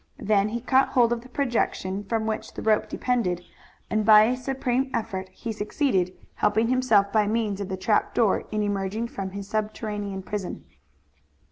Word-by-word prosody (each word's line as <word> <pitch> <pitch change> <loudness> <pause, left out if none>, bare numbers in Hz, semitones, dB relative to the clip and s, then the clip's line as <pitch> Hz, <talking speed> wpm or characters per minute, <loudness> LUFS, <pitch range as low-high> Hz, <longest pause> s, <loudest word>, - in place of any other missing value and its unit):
Then 210 0 +2
he 235 +2 -3
caught 265 +2 +3
hold 240 -2 +3
of 235 - -4
the 250 - -15
projection 230 -7 -1
from 220 +1 -1
which 220 -1 -4
the - - -6
rope 215 -1 +2
depended, 180 -9 -1 0.4
and 215 0 0
by 215 0 +8
a 240 +3 +2
supreme 260 0 -1
effort 190 -4 -3
he 225 +5 -6
succeeded, 210 - 0 0.2
helping 220 +2 +1
himself 225 -6 +3
by 215 -2 +3
means 210 -2 -1
of 200 - -4
the 190 - -3
trap 210 +3 +1
door 225 -5 +2
in 215 -1 -1
emerging 205 +3 -2
from 195 -3 -5
his 200 +1 -7
subterranean 210 -2 -3
prison. 200 - -5
215 Hz, 170 wpm, -25 LUFS, 200-235 Hz, 0.4 s, by